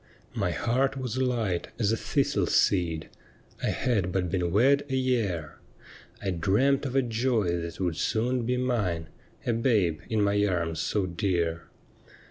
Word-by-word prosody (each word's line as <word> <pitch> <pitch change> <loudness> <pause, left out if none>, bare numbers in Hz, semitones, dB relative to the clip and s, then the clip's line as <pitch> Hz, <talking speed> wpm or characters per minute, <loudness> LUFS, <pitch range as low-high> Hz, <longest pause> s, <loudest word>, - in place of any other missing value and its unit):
' - - -31
My - - +1
heart 135 +3 0
was 130 -1 -3
light 115 -9 0
as 110 -3 +1
a - - +2
thistle - - 0
seed 85 -4 +2 0.2
— - - -29
— - - -25
I - - 0
had 105 -8 0
but 90 -2 -1
been 90 -2 0
wed 135 +8 +4
a 135 - 0
year 115 - -1 0.3
— - - -21
I 95 - 0
dreamt 120 - +2
of 130 - -5
a 135 - +4
joy 115 -6 0
that 85 0 -7
would 90 -4 -1
soon 120 +2 0
be 125 +2 0
mine 105 -11 -1 0.2
— - - -30
A 120 - +1
babe 110 - +2
in 110 -2 +1
my 100 0 +2
arms 85 -5 0
so 100 +7 0
dear. 85 -3 -1
105 Hz, 180 wpm, -27 LUFS, 90-125 Hz, 0.3 s, wed